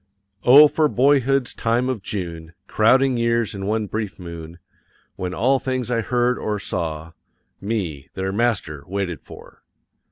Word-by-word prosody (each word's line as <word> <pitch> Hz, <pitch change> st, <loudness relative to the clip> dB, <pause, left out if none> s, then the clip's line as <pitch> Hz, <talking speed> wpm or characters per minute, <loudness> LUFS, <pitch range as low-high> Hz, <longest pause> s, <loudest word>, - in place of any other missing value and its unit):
O 145 Hz, +5 st, +9 dB
for 155 Hz, +1 st, +1 dB
boyhood's 135 Hz, -1 st, +2 dB
time 120 Hz, +2 st, 0 dB
of 130 Hz, -5 st, -2 dB
June, 85 Hz, -5 st, -6 dB
crowding 130 Hz, +5 st, +3 dB
years 115 Hz, -1 st, +1 dB
in 100 Hz, -1 st, -5 dB
one 110 Hz, 0 st, 0 dB
brief 105 Hz, -1 st, -4 dB
moon, 85 Hz, -2 st, -9 dB, 0.6 s
when 90 Hz, -1 st, -4 dB
all 130 Hz, +6 st, +2 dB
things 130 Hz, -2 st, -2 dB
I 115 Hz, -1 st, +1 dB
heard 125 Hz, +2 st, 0 dB
or 105 Hz, -1 st, -2 dB
saw, 80 Hz, -4 st, -4 dB, 0.5 s
me, 90 Hz, -10 st, -4 dB
their 95 Hz, 0 st, -2 dB
master, 100 Hz, -10 st, -1 dB
waited 95 Hz, -3 st, -3 dB
for. -, -, -14 dB
110 Hz, 140 wpm, -22 LUFS, 90-125 Hz, 0.6 s, O